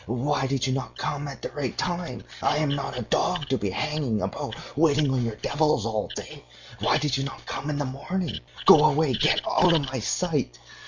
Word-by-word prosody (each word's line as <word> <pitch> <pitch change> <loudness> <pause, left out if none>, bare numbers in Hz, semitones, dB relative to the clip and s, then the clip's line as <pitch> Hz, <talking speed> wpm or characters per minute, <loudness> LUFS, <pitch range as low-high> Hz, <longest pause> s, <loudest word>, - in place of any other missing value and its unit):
'Why 135 +4 0
did 130 -2 0
you 130 - 0
not 135 0 -4
come 145 0 -3
at 140 - -9
the - - -4
right 140 -4 -3
time? 175 -1 -3 0.2
I 150 - +2
am 150 -1 +1
not 140 -3 -2
a 125 - -2
dog 150 +6 0
to 135 - +2
be 100 - -1
hanging 145 0 -1
about - - -4 0.2
waiting 150 -2 +3
on 125 -2 +1
you 115 -2 -2
devils 150 -7 +2
all 110 -2 -1
day. - - -8 0.4
Why - - +3
did 145 -3 0
you 135 - -1
not 140 - -7
come 145 - -4
in 150 - -1
the 145 - -1
morning? 140 - -3 0.3
Go 150 - +9
away! 155 -2 +3
Get - - +3
out 180 -2 +4
of 160 - +3
my 130 - -2
sight. - - -1
140 Hz, 215 wpm, -26 LUFS, 130-150 Hz, 0.4 s, Go